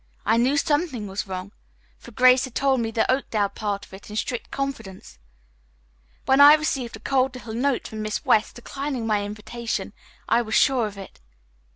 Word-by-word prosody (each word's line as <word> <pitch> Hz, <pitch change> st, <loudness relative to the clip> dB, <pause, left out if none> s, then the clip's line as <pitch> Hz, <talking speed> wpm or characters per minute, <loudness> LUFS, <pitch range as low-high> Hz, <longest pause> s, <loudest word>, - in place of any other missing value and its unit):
I 225 Hz, +2 st, +3 dB
knew 260 Hz, +5 st, +2 dB
something 290 Hz, -7 st, 0 dB
was 195 Hz, +1 st, -5 dB
wrong, 185 Hz, +1 st, -6 dB, 0.5 s
for -, -, -13 dB
Grace 255 Hz, +2 st, +4 dB
had 260 Hz, -, -12 dB
told 270 Hz, -1 st, +2 dB
me 225 Hz, -1 st, -1 dB
the 225 Hz, 0 st, 0 dB
Oakdale 220 Hz, -6 st, 0 dB
part 200 Hz, -1 st, -4 dB
of -, -, -21 dB
it 195 Hz, +2 st, -12 dB
in 210 Hz, -, -8 dB
strict 240 Hz, +2 st, -3 dB
confidence. 195 Hz, -, -6 dB, 1.1 s
When 265 Hz, +1 st, +4 dB
I 290 Hz, +1 st, +10 dB
received 270 Hz, -6 st, -2 dB
a -, -, -11 dB
cold 260 Hz, +2 st, 0 dB
little 235 Hz, -3 st, -8 dB
note 255 Hz, +2 st, 0 dB
from 215 Hz, -1 st, -6 dB
Miss 215 Hz, -1 st, -3 dB
West 215 Hz, -, +2 dB
declining 270 Hz, 0 st, -5 dB
my 210 Hz, -2 st, +1 dB
invitation, 215 Hz, +3 st, -5 dB, 0.3 s
I 235 Hz, -, +3 dB
was 220 Hz, -2 st, -3 dB
sure 255 Hz, -5 st, +3 dB
of 205 Hz, -1 st, -10 dB
it. 195 Hz, -, -11 dB
235 Hz, 185 wpm, -24 LUFS, 210-265 Hz, 1.1 s, I